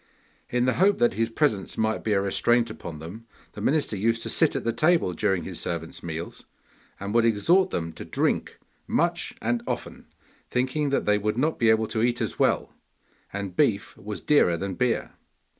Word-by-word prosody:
In 125 0 +1
the 130 - +2
hope 200 +1 +5
that 120 -3 +3
his 115 +3 0
presence 115 -6 0
might 110 0 0
be 110 - +1
a 100 - +2
restraint 115 +4 +2
upon 85 -6 -8
them, 95 +9 -10 0.2
the 105 - -9
minister 140 -1 +1
used 115 +3 0
to - - -2
sit - - +3
at - - -2
the 115 - 0
table 155 - +2
during 95 -2 0
his 90 -3 -5
servants' 85 -1 -5
meals, 85 0 -6 0.6
and 100 +1 -4
would 115 0 +4
exhort 165 - +3
them 80 - -3
to - - -8
drink - - -1 0.3
much - - 0
and 120 +1 0
often, - - -5 0.4
thinking 130 +4 0
that 140 - 0
they 105 0 +3
would 105 +2 -1
not 155 +5 0
be 115 - +4
able 110 0 +4
to 110 0 -2
eat 120 0 +1
as - - -3
well, - - +1 0.6
and 100 -2 -5
beef 100 +1 +1
was 105 0 -7
dearer 115 - +3
than 95 +2 -3
beer. 125 +5 0
110 Hz, 190 wpm, -26 LUFS, 100-120 Hz, 0.6 s, hope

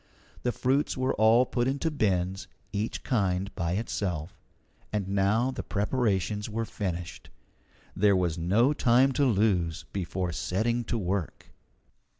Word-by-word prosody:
The 125 - 0
fruits 135 +4 0
were 130 +1 +1
all 115 +3 +5
put 120 -1 -1
into 140 +4 -1
bins, 95 -8 0 0.3
each 105 +2 -3
kind 100 -4 0
by 85 -2 -2
itself. 95 -4 -3 0.5
And 105 -3 -1
now 100 +6 +2
the 130 - -4
preparations 105 -2 -1
were 115 +2 -2
finished. 90 -5 -5 0.7
There 100 0 +4
was 90 -3 +1
no 100 - +2
time 130 0 +4
to 140 +2 +2
lose 95 -8 +1
before 90 -1 -2
setting 105 +9 -1
to 115 - -1
work. 95 -3 -3
105 Hz, 135 wpm, -28 LUFS, 90-120 Hz, 0.7 s, all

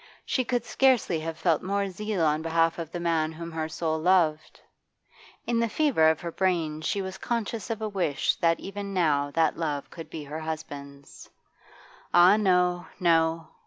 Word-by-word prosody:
She 255 - 0
could 245 -1 -1
scarcely 240 -7 +2
have 160 0 -5
felt 165 -4 +1
more 200 +1 -1
zeal 205 0 -3
on 155 0 +1
behalf 165 +1 +1
of 165 -1 -6
the 175 - -4
man 165 -2 0
whom 170 +1 -7
her 160 -1 -3
soul 160 0 -2
loved. 160 -3 +1 0.9
In 235 -1 0
the 230 0 +1
fever 230 - +3
of 160 -1 0
her 170 - -4
brain 165 -5 0
she 195 +5 -1
was 190 0 -7
conscious 230 -2 -3
of 225 -1 -3
a - - 0
wish 185 -8 0
that 165 -1 +2
even 200 0 -6
now 145 -5 +2
that 165 -1 +2
love 150 -4 -3
could 165 - -9
be 155 - -7
her 150 +2 -6
husband's. 145 -3 -8 0.9
Ah 175 +3 +7
no, 180 -4 +2
no! 165 -2 +2
170 Hz, 175 wpm, -27 LUFS, 160-195 Hz, 0.9 s, Ah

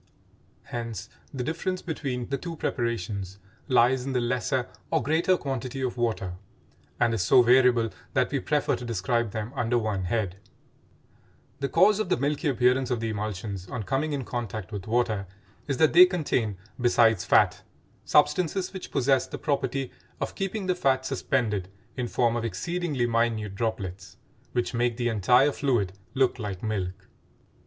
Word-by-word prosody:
Hence 115 -4 -5 0.2
the 130 -3 -3
difference 175 +5 -2
between 135 -7 -3
the 140 - 0
two 170 +1 -5
preparations 100 - -3 0.3
lies 125 -1 +4
in 135 0 -3
the 125 - +2
lesser 125 +1 0 0.2
or - - +1
greater 165 +7 +2
quantity 135 -2 -4
of 130 -2 -1
water, 110 -7 -1 0.7
and 120 -1 +3
is 110 - 0
so 120 +7 +6
variable 120 -2 +4 0.2
that - - +2
we - - 0
prefer - - +1
to - - -8
describe 115 +1 0
them 110 +3 -4
under 120 +1 +1
one 105 -5 -1
head. 95 -2 -1 1.2
The 140 -1 -1
cause 205 +8 +5
of 215 - -1
the - - +2
milky 145 +4 -1
appearance 125 -1 +2
of 125 -2 0
the 115 0 -2
emulsions 100 -2 -4
on 110 +3 -4
coming 135 +8 -1
in 140 -3 -2
contact 110 -4 -5
with 100 -2 -6
water 110 -4 0 0.4
is 140 -3 -1
that 155 -1 +4
they 180 +2 +9
contain, 130 - -1 0.2
besides 115 -5 +4
fat, - - +3 0.4
substances 165 +6 +2
which 190 - -7
possess 135 +1 +2
the - - -6
property 135 -2 -1 0.3
of - - -3
keeping 195 +1 -3
the 185 - +2
fat 135 -7 +1
suspended 105 -12 -1 0.3
in 125 -2 -2
form 120 -1 +1
of 120 - -1
exceedingly 160 +1 -1
minute 115 -3 0
droplets 100 -3 -4 0.4
which 120 +1 -1
make 120 -1 0
the 120 -1 0
entire 125 +6 +4
fluid 120 -11 0 0.2
look 130 -1 +2
like 100 -4 -5
milk. 95 -4 -3
120 Hz, 160 wpm, -27 LUFS, 110-135 Hz, 1.2 s, they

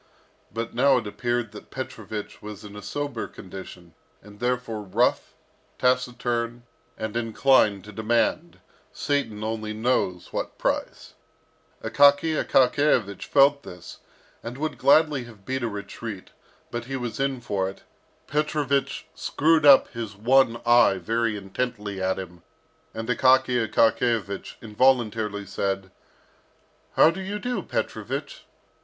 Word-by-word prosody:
But 115 +2 -4
now 135 +2 +4
it 120 - -2
appeared 120 +1 -2
that 105 - -12
Petrovich 110 -5 -7
was 105 -1 -9
in 105 0 -10
a 105 - -8
sober 140 +2 -4
condition, 90 -2 -11 0.3
and 105 0 -15
therefore 120 -3 -2
rough, 95 -3 0 0.4
taciturn, 120 -2 0 0.3
and 110 0 -4
inclined 115 -3 +3
to 105 - -11
demand, 120 - 0 0.3
Satan 135 -8 -2
only 110 -1 -3
knows 110 -6 -1
what - - -4
price. - - -2 0.7
Akaky 145 +3 +4
Akakiyevich 125 -6 +2
felt 140 0 +4
this, 90 -8 -11 0.4
and 120 +2 -7
would 155 +2 -3
gladly 140 -1 +4
have 110 -4 -15
beat 130 0 -2
a 120 - -1
retreat, 105 0 -7 0.4
but 120 0 -4
he 135 +2 -4
was 120 -3 -4
in 135 -1 0
for 100 -5 -2
it. 95 - -12 0.4
Petrovich 145 -2 -1
screwed 155 0 +2
up 140 -2 +8
his 115 -4 -6
one 120 +2 +3
eye 120 -4 +5
very 115 +4 -1
intently 105 0 -4
at 95 0 0
him, 90 -2 -8 0.5
and 115 0 -5
Akaky 125 -2 +3
Akakiyevich 110 -3 +1
involuntarily 110 -3 +1
said, 95 0 -3 1.0
"How 160 - +7
do 190 - -6
you 200 +2 -4
do, 245 +3 -2
Petrovich?" - - -4
115 Hz, 125 wpm, -25 LUFS, 105-130 Hz, 1.0 s, up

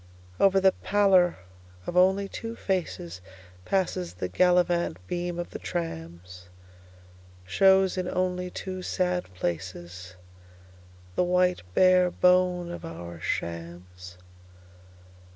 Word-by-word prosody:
Over 195 0 +5
the 190 0 +5
pallor 195 -4 +3 0.5
of 175 - -5
only 190 +2 +4
two 230 +3 -6
facesPasses 95 - -4
the 90 0 -4
gallivant 175 - +2
beam 175 - -3
of 175 - -5
the - - -7
trams; 90 - -6 1.0
Shows 190 - +4
in 180 0 -2
only 180 0 -1
two 185 +1 -6
sad 180 -1 -1
placesThe 90 +1 -5 1.0
white 180 0 +2
bare 185 -1 +5
bone 180 -1 +2
of 175 - -7
our 85 +1 -8
shams. 90 +2 -6
175 Hz, 100 wpm, -27 LUFS, -, 1.0 s, Over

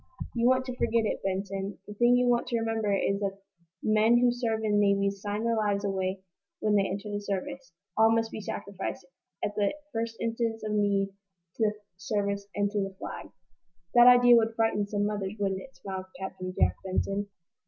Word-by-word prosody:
"You 235 0 +2
want 260 0 +3
to 255 -1 -5
forget 230 -2 +1
it, - - -2
Benson. 195 +1 -3
The 210 - -8
thing 240 +3 +4
you 250 - +3
want 240 0 +2
to 240 -2 0
remember 225 -2 0
is 200 0 +1
that 195 -1 -2 0.5
men 220 +2 +4
who 245 0 +4
serve 230 -2 -1
in 210 -1 +2
navies 200 -1 +2
sign 205 +1 -2
their 230 0 +1
lives 205 -2 0
away 190 -1 -2 0.4
when 215 - +1
they 200 -1 +3
enter 200 +2 -4
the 205 - -2
service. 230 +8 -4 0.2
All 220 0 +5
must 225 0 +1
be 215 - -5
sacrificed, 195 -2 -5 0.4
at 205 - -3
the 205 +2 0 0.2
first 225 0 -2
instant 230 -1 -1
of 215 - -2
need, 200 -2 +2 0.5
to - - +1
the 210 - +1 0.2
service 200 0 -2
and 205 0 +1
to 210 - -1
the 195 -1 -3
Flag!" - - -7 0.6
"That 240 0 +8
idea 245 -1 +8
would 225 0 +1
frighten 225 -2 +1
some 205 0 0
mothers, 205 -1 -2
wouldn't 195 -1 -1
it?" 270 - -13
smiled 190 -1 -6
Captain 185 -1 -5
Jack - - +3
Benson. 195 +2 -1
205 Hz, 195 wpm, -28 LUFS, 200-225 Hz, 0.6 s, That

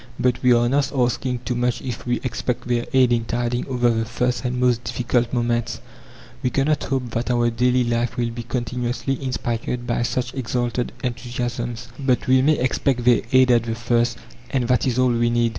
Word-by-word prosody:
But 125 0 +1
we 125 - +4
are 120 0 +4
not 140 +3 +1
asking 125 -1 0
too 125 - -1
much 120 0 0
if 125 -1 -5
we 120 0 +1
expect 125 -1 -3
their 120 -1 0
aid 130 -2 +4
in 115 -1 +1
tiding 120 +1 -1
over 125 -2 +2
the 115 0 0
first 125 +3 -1
and 125 0 -2
most 125 -1 +2
difficult 120 0 0
moments. 120 -1 -1 0.6
We 125 - +1
cannot 145 +3 +1
hope 130 -3 -2
that 115 +2 -2
our 120 -1 +2
daily 125 +2 +2
life 120 +1 -1
will 120 -1 0
be 120 +1 -5
continuously 125 +3 -3
inspired 120 -1 -2
by 120 0 -1
such 120 0 -1
exalted 125 -1 -2
enthusiasms, 120 -1 -3
but 130 -3 +1
we 130 0 +4
may 150 +3 +3
expect 130 -1 0
their 120 -2 +5
aid 130 -1 +5
at 120 -1 +5
the 115 0 -3
first, 120 0 +1 0.3
and 130 -4 0
that 125 +2 +2
is 125 -1 0
all 130 0 +4
we 120 0 +2
need. 120 0 +2
120 Hz, 195 wpm, -22 LUFS, 120-125 Hz, 0.6 s, their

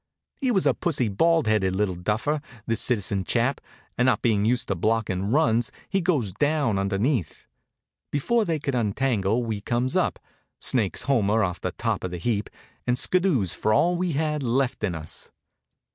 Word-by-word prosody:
He 265 -3 0
was 195 -6 +2
a - - +4
pussy, 140 - -1
bald 165 +10 +2
headed 100 -4 +1
little 100 -1 0
duffer, 110 - -1 0.2
this 115 -2 0
citizen 100 -5 +1
chap, 120 +7 +1 0.4
and 125 - +4
not 130 - +2
bein' 105 -3 +2
used 120 +2 +1
to 95 - +1
blockin' 100 -1 0
runs 120 -5 +2 0.2
he 195 0 +1
goes 145 - 0
down 145 - +1
underneath. 100 - -1 0.6
Before 225 - +1
they 165 -5 -1
could 140 -2 -3
untangle 115 -1 0
we 110 -3 -3
comes 120 +4 -1
up, - - +1 0.4
snakes 110 -7 0
Homer 110 -5 +2
off 90 -1 -2
the 90 - -3
top 115 -4 -2
of 95 - -2
the 90 - -5
heap, 105 +2 -1 0.4
and 125 0 +2
skiddoos 165 - +2
for 110 - +1
all 175 +7 +3
we 175 -1 -1
had 150 0 -1
left 130 -1 0
in 95 -5 0
us. 80 0 -8
115 Hz, 175 wpm, -25 LUFS, 100-145 Hz, 0.6 s, a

